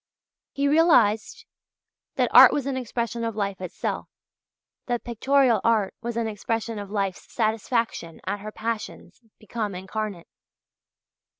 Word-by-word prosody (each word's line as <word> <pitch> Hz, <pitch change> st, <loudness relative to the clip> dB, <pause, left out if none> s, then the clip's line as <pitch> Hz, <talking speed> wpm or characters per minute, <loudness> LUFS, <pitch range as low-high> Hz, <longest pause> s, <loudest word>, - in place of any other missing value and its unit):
He 280 Hz, 0 st, 0 dB
realized 300 Hz, -, +3 dB, 0.7 s
that -, -, +1 dB
art -, -, +10 dB
was 285 Hz, -, -1 dB
an 275 Hz, -1 st, -2 dB
expression 235 Hz, -1 st, -3 dB
of 225 Hz, -2 st, -2 dB
life 200 Hz, -3 st, -3 dB
itself, 185 Hz, -, -4 dB, 0.8 s
that 240 Hz, -1 st, -1 dB
pictorial 240 Hz, -1 st, +2 dB
art 220 Hz, -4 st, +2 dB
was 235 Hz, -1 st, -4 dB
an 230 Hz, -, 0 dB
expression 220 Hz, +1 st, -3 dB
of 200 Hz, -1 st, -7 dB
life's 195 Hz, -3 st, -3 dB
satisfaction 220 Hz, -6 st, -1 dB
at 200 Hz, +2 st, -2 dB
her 215 Hz, +2 st, -7 dB
passions 225 Hz, +2 st, -5 dB, 0.2 s
become 215 Hz, -2 st, -4 dB
incarnate. 190 Hz, -1 st, -5 dB
225 Hz, 125 wpm, -25 LUFS, 205-240 Hz, 0.8 s, art